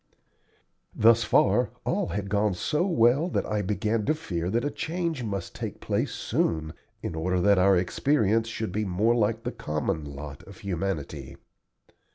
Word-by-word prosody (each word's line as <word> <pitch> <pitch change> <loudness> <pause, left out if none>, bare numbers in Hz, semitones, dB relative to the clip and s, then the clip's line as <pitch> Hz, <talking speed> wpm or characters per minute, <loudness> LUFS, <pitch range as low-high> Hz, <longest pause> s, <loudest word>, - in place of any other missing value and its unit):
Thus 115 +1 +5
far - - +3 0.2
all - - 0
had 100 +3 -3
gone 100 -1 +1
so 150 - 0
well 140 +1 +3
that - - -1
I 105 -1 -1
began 105 +2 0
to 155 - +3
fear 90 - -3
that 120 +6 0
a 145 - -1
change 165 -4 -2
must 100 -5 -4
take - - -6
place - - -1
soon, 80 -1 -1 0.3
in - - -3
order 90 +3 0
that 100 +1 +4
our 95 0 +5
experience 110 +4 +1
should 110 -3 -4
be 105 +3 -1
more 105 +4 +2
like 115 0 +1
the 125 - -2
common 75 - -2
lot 70 0 -8
of 100 - -12
humanity. 85 -8 -4
105 Hz, 165 wpm, -27 LUFS, 90-115 Hz, 0.3 s, Thus